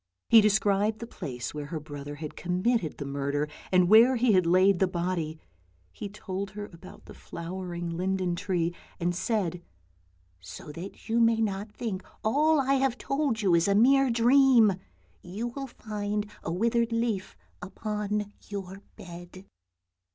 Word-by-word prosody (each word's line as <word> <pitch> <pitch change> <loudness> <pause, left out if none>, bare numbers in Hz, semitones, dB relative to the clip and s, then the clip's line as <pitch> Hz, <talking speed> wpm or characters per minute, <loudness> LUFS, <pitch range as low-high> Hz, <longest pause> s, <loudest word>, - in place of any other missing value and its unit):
He 225 - +9
described 210 0 +2
the 235 - -7
place 125 - -6
where 150 -1 -5
her 160 0 -4
brother 145 -1 -8
had 150 0 -7
com 180 +1 -3
mitted 230 -10 +1
the 140 - -5
murder, 140 +1 -2 0.2
and 180 -1 +4
where 230 +6 +7
he 245 -1 +3
had 185 -4 +3
laid 185 +1 +4
the 190 - +3
body; 170 -3 -3 0.5
he 205 - -7
told 195 -1 -5
her 205 +1 -7
about 180 +3 -13
the - - -11
flowering 175 0 -6
linden 185 +1 -1
tree, 175 -2 -1 0.3
and 175 +1 0
said, 185 -2 -1 0.4
" 90 0 -38
So 90 - -10
that 175 +8 -9
you 230 +1 +1
may 230 -1 +4
not 205 -1 -2
think 210 -4 -4 0.2
all 300 +7 +3
I 270 0 +2
have 265 -2 +1
told 275 -6 -1
you 185 -3 +3
is 170 +1 +3
a 200 - +3
mere 270 +5 +5
dream, 240 -2 +5 0.5
you 205 +7 -5
will 270 +3 -6
find 210 -3 -4
a 160 - -4
withered 235 +5 +1
leaf 230 - -2 0.2
upon 210 0 -3 0.2
your 195 -1 -6
bed." 175 +2 -11
195 Hz, 160 wpm, -28 LUFS, 175-225 Hz, 0.5 s, He